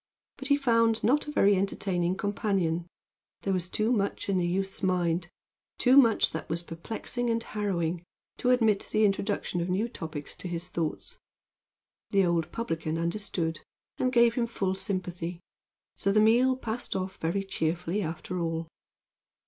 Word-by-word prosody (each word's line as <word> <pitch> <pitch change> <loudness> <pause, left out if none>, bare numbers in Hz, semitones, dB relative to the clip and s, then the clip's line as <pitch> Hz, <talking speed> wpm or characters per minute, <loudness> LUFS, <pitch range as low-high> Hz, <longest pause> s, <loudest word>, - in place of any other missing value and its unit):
But 270 - -6
he 285 0 +4
found 230 -4 +3
not 285 +6 +3
a - - -3
very 205 -8 +4
entertaining 185 -2 0
companion. 190 -5 0 0.6
There 195 - +1
was 180 -1 -1
too 215 +4 0
much 200 -3 0
in 190 -2 +2
the 175 - +1
youth's 195 +3 -2
mind 175 -2 +1 0.5
too 255 +1 +4
much 235 -6 +6
that 160 - -5
was 170 +2 -2
perplexing 220 +8 -4
and 230 0 0
harrowing 180 -6 -2 0.4
to 250 - +1
admit 225 -5 +3
the 215 0 +4
introduction 195 -3 0
of 170 - -2
new 195 +6 +1
topics 160 - -6
to - - -6
his 175 +1 -4
thoughts. 165 -2 -4 0.9
The 195 -2 +3
old 170 -1 0
publican 165 -7 -2
understood, 170 -2 -2 0.4
and 255 - +2
gave 235 -2 +5
him 235 -1 0
full 195 -5 -1
sympathy; 180 -3 -3 0.6
so 200 - +1
the 215 - +4
meal 240 +4 +5
passed 235 -1 -3
off 190 0 -3
very 170 +5 -1
cheerfully 175 +1 -1
after 175 +1 -4
all. 165 -1 -2
195 Hz, 155 wpm, -28 LUFS, 170-225 Hz, 0.9 s, much